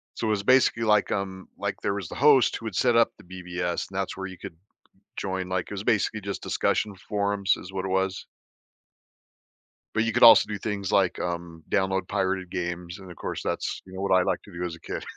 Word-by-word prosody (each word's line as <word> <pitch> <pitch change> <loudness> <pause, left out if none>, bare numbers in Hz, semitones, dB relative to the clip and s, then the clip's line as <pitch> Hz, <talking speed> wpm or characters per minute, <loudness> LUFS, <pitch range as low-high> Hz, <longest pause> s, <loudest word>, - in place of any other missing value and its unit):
So, 115 - -2
it 110 - +2
was 100 -1 0
basically 130 -1 +4
like, 105 -1 +3
um, 95 -1 -3
like - - -2
there 100 - 0
was 100 -5 -5
the - - -7
host 140 -2 +5
who 115 - -11
would 110 - -4
set 120 +2 +3
up 115 - +4
the - - -16
BBS 90 -1 -4
and 95 - -7
that's 95 0 -2
where 95 - -4
you 95 -1 -10
could - - -9 0.6
join, 95 -1 -3
like, 95 -2 -1
it - - -14
was 100 - -4
basically 110 -1 +1
just 100 0 -5
discussion 105 -2 0
forums, 100 0 0
is 95 +2 -10
what 95 0 -3
it - - -3
was. 95 0 -1 1.7
But 110 - +2
you 115 - -1
could - - +3
also 115 - +9
do 105 -1 -3
things 100 -2 -3
like, 95 -3 +2
um, 85 -2 -4
download 95 0 0
pirated 95 -2 -1
games, 85 +1 -4
and, 95 -2 -11
of 85 - -12
course, - - -5
that's, - - -3
you 95 - -13
know, 95 - -5
what 100 - +1
I 90 - +3
liked - - -1
to - - -14
do 85 +1 -5
as 85 -2 -3
a 85 - -15
kid. - - -6
95 Hz, 235 wpm, -26 LUFS, 90-105 Hz, 1.7 s, also